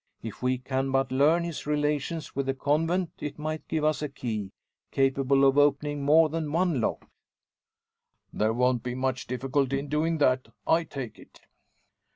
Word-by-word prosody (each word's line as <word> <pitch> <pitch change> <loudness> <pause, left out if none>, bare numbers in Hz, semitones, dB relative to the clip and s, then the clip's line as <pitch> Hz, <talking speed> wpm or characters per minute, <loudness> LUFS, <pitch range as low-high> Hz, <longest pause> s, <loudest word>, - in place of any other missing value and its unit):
If 110 -2 -7
we 125 0 +1
can 130 +1 -2
but 135 0 +1
learn 150 +6 +3
his 170 -3 -5
relations 150 +1 -1
with 140 0 -1
the 135 - 0
convent 165 +5 0
it 145 -1 -5
might 155 +1 -4
give 160 -2 -1
us 155 0 +1
a 150 - -2
key, 110 -7 -4 0.4
capable 135 0 +2
of 135 +1 +4
opening 145 0 +2
more 155 +3 +5
than 155 -1 -3
one 165 -5 +1
lock." - - -2 1.3
"There 110 +1 +1
won't 125 +1 +1
be 125 +1 -4
much 130 -1 -2
difficulty 135 +2 0
in 140 +1 -5
doing 160 +3 +1
that, 130 -3 +2 0.2
I 165 +1 +3
take 130 -8 -7
it. - - -17
140 Hz, 170 wpm, -27 LUFS, 130-155 Hz, 1.3 s, more